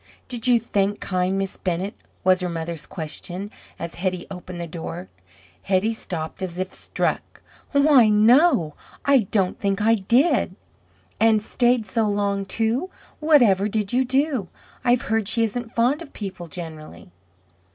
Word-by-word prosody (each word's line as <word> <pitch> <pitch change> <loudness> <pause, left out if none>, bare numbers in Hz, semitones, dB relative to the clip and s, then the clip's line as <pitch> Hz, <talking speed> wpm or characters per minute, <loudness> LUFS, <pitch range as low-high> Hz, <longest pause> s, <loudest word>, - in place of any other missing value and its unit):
"Did 245 -2 +1
you 245 -1 +5
thank 205 -2 -1
kind 185 0 -1
Miss 195 0 -3
Bennett?" 185 +3 -2 0.3
was 185 0 +4
her 180 - -1
mother's 165 -1 -5
question 180 +4 -6 0.3
as 170 0 -6
Hetty 185 0 -2
opened 180 -1 -8
the 170 - -3
door. 160 - -7 0.5
Hetty 195 +4 +1
stopped 170 -5 -6
as 180 -2 -4
if 185 +1 -3
struck, - - -3 0.3
"Why, 280 -5 +5
no! 215 - +4 0.3
I 270 -7 +4
don't 190 -4 0
think 195 0 0
I 220 +2 +4
did." 235 - +2 0.6
"And 220 -1 +4
stayed 240 +2 +1
so 215 +2 0
long, 200 -1 0
too? 230 - 0 0.3
Whatever 240 -11 +4
did 210 -1 -2
you 255 +2 +3
do? 265 - 0 0.4
I've 245 -1 +3
heard 220 -2 0
she 230 +1 +2
isn't 225 +1 -3
fond 250 +7 +2
of 310 - -11
people 190 -4 -6
generally." 155 - -9
205 Hz, 150 wpm, -23 LUFS, 185-240 Hz, 0.6 s, you